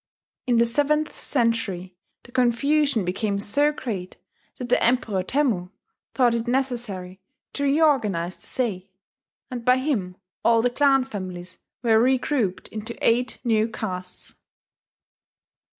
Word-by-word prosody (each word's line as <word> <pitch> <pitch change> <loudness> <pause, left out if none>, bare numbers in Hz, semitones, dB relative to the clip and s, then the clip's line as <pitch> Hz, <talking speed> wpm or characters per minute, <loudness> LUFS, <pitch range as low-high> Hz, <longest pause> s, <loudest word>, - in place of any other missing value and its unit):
In 240 -2 +3
the 235 - +5
seventh 295 +5 +1
century 225 -8 0 0.3
the 240 - -16
confusion 260 0 +2
became 200 +3 -1
so 285 +9 +2
great 205 -11 -5 0.4
that 250 -1 -6
the - - +3
Emperor 230 -5 +2
Temmu 210 -5 0 0.5
thought 245 -3 +4
it 235 0 -2
necessary 235 -8 -2 0.3
to 285 - -1
reorganize 260 - +2
the - - -13
sei; 205 -7 -2 0.6
and 245 -2 -5
by 250 +2 +4
him 220 -10 -2 0.3
all 230 -1 +4
the 245 - +2
clan 270 0 +3
families 185 -7 -7 0.2
were 225 -2 +4
regrouped 250 -5 +1
into 220 +2 -6
eight 245 +2 +1
new 220 -2 +2
castes. 185 -5 -6
235 Hz, 125 wpm, -24 LUFS, 195-260 Hz, 0.6 s, the